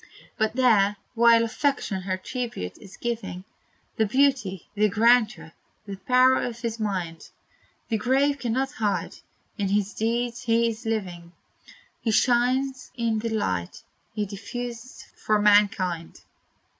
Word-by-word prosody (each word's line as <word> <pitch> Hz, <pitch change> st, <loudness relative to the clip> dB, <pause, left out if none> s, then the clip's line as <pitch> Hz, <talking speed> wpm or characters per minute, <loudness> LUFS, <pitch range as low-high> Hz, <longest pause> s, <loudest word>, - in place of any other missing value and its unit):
But 220 Hz, 0 st, 0 dB
there, 210 Hz, -6 st, +3 dB, 0.2 s
while 230 Hz, -1 st, +5 dB
affection 230 Hz, -4 st, -1 dB
her 185 Hz, 0 st, -2 dB
tribute 230 Hz, -, -5 dB
is 195 Hz, -2 st, -13 dB
giving, 220 Hz, -6 st, -4 dB, 0.5 s
The 220 Hz, -, +2 dB
beauty, 255 Hz, -, +1 dB
the 210 Hz, 0 st, +2 dB
grandeur, 215 Hz, -6 st, +3 dB, 0.3 s
the 200 Hz, -1 st, -6 dB
power 255 Hz, +4 st, +4 dB
of 235 Hz, -1 st, -5 dB
his 230 Hz, -1 st, -3 dB
mind 180 Hz, -7 st, -3 dB, 0.6 s
The 220 Hz, -, 0 dB
grave 275 Hz, +4 st, +2 dB
cannot 260 Hz, +2 st, -1 dB
hide! 210 Hz, -3 st, -2 dB, 0.4 s
in 200 Hz, -, 0 dB
his 200 Hz, 0 st, 0 dB
deeds 235 Hz, +2 st, -1 dB
he 235 Hz, -1 st, +2 dB
is 225 Hz, +1 st, -7 dB
living; 180 Hz, -6 st, -4 dB, 0.7 s
He 230 Hz, -, -1 dB
shines 255 Hz, +3 st, +1 dB
in 230 Hz, -2 st, 0 dB
the 230 Hz, +1 st, -3 dB
light 90 Hz, -, -2 dB, 0.3 s
he 210 Hz, -1 st, -1 dB
diffused 235 Hz, +5 st, -7 dB, 0.2 s
for 215 Hz, -1 st, +2 dB
mankind! 200 Hz, -5 st, +2 dB
225 Hz, 130 wpm, -25 LUFS, 200-245 Hz, 0.7 s, while